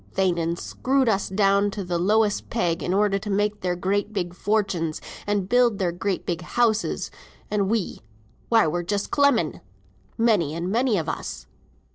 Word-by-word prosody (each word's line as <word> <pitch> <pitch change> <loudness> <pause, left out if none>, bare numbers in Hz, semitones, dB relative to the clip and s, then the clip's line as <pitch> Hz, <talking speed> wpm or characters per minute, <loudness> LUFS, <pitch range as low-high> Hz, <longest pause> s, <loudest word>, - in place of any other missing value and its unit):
They'n 170 -2 +1
screwed 265 +8 0
us 205 -3 +1
down 200 +1 +3
to 200 -1 -5
th' - - -14
lowest 210 +2 +2
peg, 175 -7 0
in - - -2
order 200 0 +2
to 210 +1 -7
make 205 +1 0
their 180 -1 0
great 200 +4 -1
big 180 -4 -3
fortunes, 195 -6 -1 0.3
and 205 -2 0
build 240 -1 +3
their 185 -3 0
great 185 +2 -2
big 170 -2 -2
houses, 220 +4 0 0.4
and 200 -2 +1
we, 220 -4 -1 0.5
why 225 -2 +5
we're 165 +3 0
just 200 +4 -2
clemming, 280 - +2 0.6
many 205 -10 +2
and 175 +3 -3
many 235 -1 +2
of 160 - -2
us. - - -5
200 Hz, 165 wpm, -24 LUFS, 180-215 Hz, 0.6 s, why